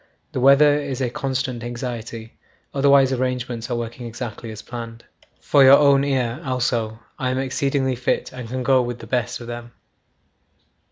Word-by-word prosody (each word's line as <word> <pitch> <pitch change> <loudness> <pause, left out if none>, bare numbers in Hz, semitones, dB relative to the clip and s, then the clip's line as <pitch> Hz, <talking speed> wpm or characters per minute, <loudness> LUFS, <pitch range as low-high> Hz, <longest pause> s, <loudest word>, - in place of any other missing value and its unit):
The - - -3
weather 145 +3 +6
is 140 -3 -4
a 125 -3 -1
constant 130 -2 -3
anxiety, 120 -2 -6 0.4
otherwise 140 -1 +4
arrangements 125 -2 -2
are 120 - -1
working 120 +1 -5
exactly 115 0 -7
as 110 -1 -8
planned. 115 -1 -8 0.4
'For 140 -2 +4
your 135 +1 +9
own 140 -2 +4
ear 130 -4 -1
also, 120 -4 -1 0.2
I 130 - 0
am 130 - -1
exceedingly 135 0 0
fit 125 - -1
and 125 -3 -7
can 130 +1 -3
go 130 +1 +4
with 120 -1 -4
the - - -11
best 125 -5 -2
of - - -7
them. 120 0 -8
125 Hz, 165 wpm, -22 LUFS, 120-135 Hz, 0.4 s, your